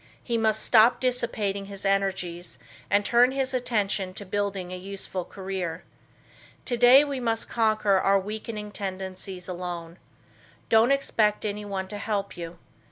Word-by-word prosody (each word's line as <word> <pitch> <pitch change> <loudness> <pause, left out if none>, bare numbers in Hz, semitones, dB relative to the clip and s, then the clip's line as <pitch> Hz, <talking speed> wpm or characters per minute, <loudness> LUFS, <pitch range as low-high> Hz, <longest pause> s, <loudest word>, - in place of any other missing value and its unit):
He 235 - -1
must 220 -1 +1
stop 230 +1 +6
dissipating 230 -6 -1
his 200 0 -7
energies 185 - -1 0.3
and 205 +1 +3
turn 245 +2 +4
his 270 -1 -1
attention 205 -6 -1
to 205 - -6
building 195 -2 -2
a - - -3
useful 190 0 -5
career. 185 -3 -5 0.8
Today 245 +3 +6
we 280 -2 -3
must 230 -2 -1
conquer 215 -4 +2
our 195 +1 +4
weakening 210 +1 -5
tendencies 190 -2 -5
alone. 175 -1 -6 0.7
Don't 225 +3 +5
expect 220 -7 +1
anyone 200 -2 -3
to 205 - -6
help 205 -2 -2
you. 170 0 -7
200 Hz, 135 wpm, -26 LUFS, 190-225 Hz, 0.8 s, stop